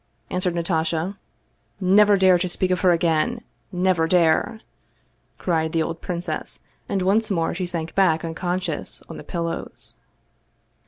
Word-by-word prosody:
" - - -41
answered 180 -1 0
Natasha. 165 +1 -1 0.3
" - - -43 0.2
Never 205 -1 +6
dare 185 -2 +5
to 180 +1 -1
speak 185 +1 0
of 180 - +1
her 185 - +4
again! 170 +7 +1 0.3
Never 180 -3 +2
dare! 175 +6 +2 0.4
" - - -42
cried 160 -3 0
the 165 -1 +2
old 165 +1 -5
princess, 175 -1 -4 0.3
and 195 -2 0
once 210 +4 +2
more 165 -5 0
she 180 +1 -3
sank 165 -2 -4
back 170 -4 +3
unconscious 175 0 -3
on - - -7
the - - -9
pillows. 170 -1 -4
175 Hz, 155 wpm, -23 LUFS, 165-185 Hz, 0.4 s, Never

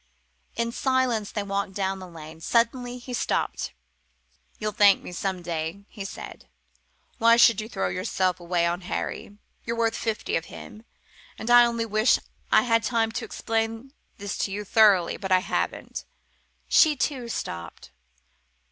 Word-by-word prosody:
In 235 0 -1
silence 255 -5 0
they 205 - -2
walked 200 -1 -2
down 195 -1 -1
the 185 - -9
lane. 160 -1 -11
Suddenly 245 +5 +1
he 250 0 -8
stopped. - - -1 0.9
"You'll 215 -1 -2
thank 205 -2 +5
me - - -8
some 185 0 -3
day," 165 +4 -4
he 200 -4 -7
said. - - -9 0.7
"Why 230 0 +6
should 230 -3 +6
you 215 - -8
throw 95 - -1
yourself 180 - -1
away 175 0 0
on 175 +2 -1
Harry? 200 +2 -5 0.3
You're 230 0 -3
worth 230 -1 +1
fifty 225 -2 -2
of 165 - -1
him. 220 +4 -11 0.5
And 225 +2 -3
I 240 0 +9
only 235 -1 -1
wish 215 +2 +3 0.3
I - - +6
had 230 -2 +3
time 225 -1 +1
to 230 +1 -4
explain 225 +4 -3 0.2
this 200 0 -5
to 195 - -1
you 205 +2 -3
thoroughly, 200 -5 +4
but 190 -1 -5
I 185 - +7
haven't!" 185 - -3 0.6
She, 310 -2 +5
too, 270 0 -1
had 235 -1 -6
stopped. 85 0 -6
215 Hz, 160 wpm, -26 LUFS, 185-235 Hz, 0.9 s, I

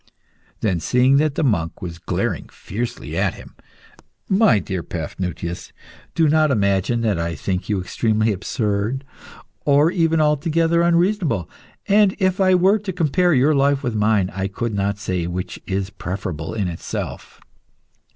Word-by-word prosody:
Then, 95 -6 +1
seeing 125 +8 +3
that 150 -1 +1
the - - 0
monk 90 - 0
was 85 -2 -7
glaring - - -2
fiercely 115 +5 -5
at - - 0
him - - -13 0.7
"My 190 - +4
dear 95 -2 -3
Paphnutius, 85 +1 -5 0.4
do 165 -2 +3
not 155 0 +3
imagine 100 0 +1
that 105 -6 0
I 85 0 -2
think 90 +7 -3
you 105 -2 +1
extremely 110 +4 0
absurd, 105 +5 -2 0.6
or 145 +3 +4
even 165 -2 +2
altogether 165 +3 +2
unreasonable. 170 - +1 0.4
And 205 -1 +4
if 190 -1 +1
I 185 -1 +5
were 190 +4 +4
to 200 -2 -4
compare 175 0 +2
your 135 +4 +4
life 140 0 +2
with 120 - -1
mine, 105 -3 +2
I 95 +1 -2
could 110 +3 -3
not 100 0 -1
say 90 -4 -2
which 90 +1 -5
is 95 +1 -2
preferable 90 -4 -5
in 100 -4 -1
itself. 85 -2 -6
115 Hz, 150 wpm, -21 LUFS, 95-155 Hz, 0.7 s, I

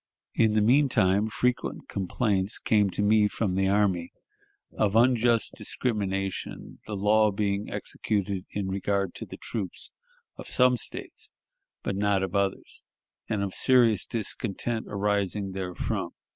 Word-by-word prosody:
In 110 -2 +3
the 110 - +3
mean 135 +6 +4
time, 100 0 +2
frequent 125 +2 -1
complaints 100 0 -1
came 105 -3 +2
to 100 - -1
me 105 0 +4
from 105 -2 -2
the 95 +1 +1
army, 95 -4 +1 0.6
of 105 -1 +1
unjust 120 -1 +3
discrimination, 95 -5 -3
the 105 - -4
law 105 +2 +4
being 100 0 -1
executed 100 -3 -2
in 100 -2 -3
regard 100 -1 -1
to - - -7
the - - -9
troops 100 -6 -6 0.5
of - - -9
some 125 0 +4
States - - -4 0.5
but 100 - -2
not 100 -1 +1
of 95 -1 -3
others, 100 -1 -2 0.5
and 105 -3 0
of 95 -1 -3
serious 120 -6 +4
discontent 115 0 -2
arising 100 -1 -1
therefrom. 90 -2 -3
105 Hz, 135 wpm, -27 LUFS, 95-110 Hz, 0.6 s, mean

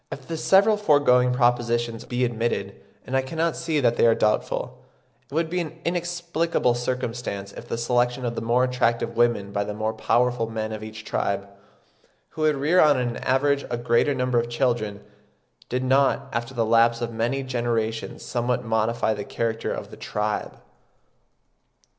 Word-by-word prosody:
If 140 - -6
then 130 - -20
the 165 - -3
several 200 +6 +4
foregoing 145 -9 +4
propositions 120 -2 +1
be 125 0 0
admitted, 115 -4 -2 0.3
and 130 - -3
I 135 - +3
cannot 160 +5 -1
see 165 -2 -1
that 120 -2 +2
they - - +5
are 115 - +5
doubtful, 105 0 -1 0.5
it - - -14
would 165 0 +1
be 180 +3 -2
an 165 -1 -5
inexplicable 170 -5 0
circumstance 120 -5 -3
if 120 - -10
the 115 - -3
selection 120 +1 0
of 120 - -1
the - - -4
more 120 +2 +2
attractive 120 -2 0
women 115 -4 +1
by 100 0 0
the 105 0 -5
more 110 +1 -1
powerful 120 +1 +1
men 110 -1 -3
of 110 -1 -5
each 110 0 -9
tribe, 100 0 -1 0.8
who 155 - -8
would 155 -1 +3
rear 150 +7 +2
on 150 -3 +5
an 120 -2 -2
average 140 +2 +1
a 120 - -2
greater 120 +4 +2
number 125 -1 +1
of 120 0 -2
children, 120 -5 -1 0.7
did 125 +1 -1
not 135 +1 +2
after 120 +2 -3
the 115 -1 +1
lapse 115 +1 +4
of 120 -1 -3
many 120 +5 -1
generations 120 -3 -2
somewhat 125 0 -1
modify 110 0 +1
the 105 -1 -5
character 115 +1 -2
of - - -6
the - - -11
tribe. 105 0 -3
120 Hz, 175 wpm, -24 LUFS, 115-135 Hz, 0.8 s, they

